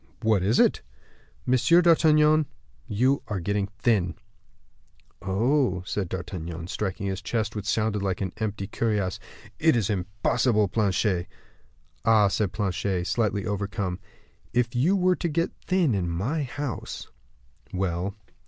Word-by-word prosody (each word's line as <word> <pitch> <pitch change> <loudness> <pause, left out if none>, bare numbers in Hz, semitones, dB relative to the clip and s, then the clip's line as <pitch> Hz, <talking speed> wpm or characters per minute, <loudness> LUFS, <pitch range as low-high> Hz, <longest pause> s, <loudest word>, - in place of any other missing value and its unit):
"What 110 -4 +3
is 105 +6 +2
it?" - - +4 0.6
"Monsieur 130 +7 +4
d'Artagnan, 155 -2 +5 0.4
you 130 +7 +2
are 105 -4 -2
getting 100 +3 -1
thin." 100 -3 0 1.1
"Oh!" 100 0 +1
said 95 -1 -2
D'Artagnan, 85 -3 -5
striking 100 +1 -3
his 95 0 -2
chest 110 0 -2
which 105 -1 -4
sounded 105 -2 0
like 95 -2 -1
an 95 -2 -3
empty 105 -2 -3
cuirass, 105 -3 -1 0.4
"it 160 -2 +4
is 110 -3 +1
impossible, 105 +3 +1
Planchet." 100 -3 +1 0.8
"Ah!" 110 -3 +5
said 100 -1 0
Planchet, 95 -2 -1
slightly 105 -2 0
overcome; 100 -3 -2 0.5
"if 120 0 +1
you 155 +11 +3
were 185 -1 +3
to 175 - -2
get 165 +3 0 0.2
thin 180 -8 +2
in 90 -4 -1
my 110 - -1
house 140 -1 -5 0.3
" - - -36
"Well?" 95 +1 -2
105 Hz, 135 wpm, -26 LUFS, 95-125 Hz, 1.1 s, d'Artagnan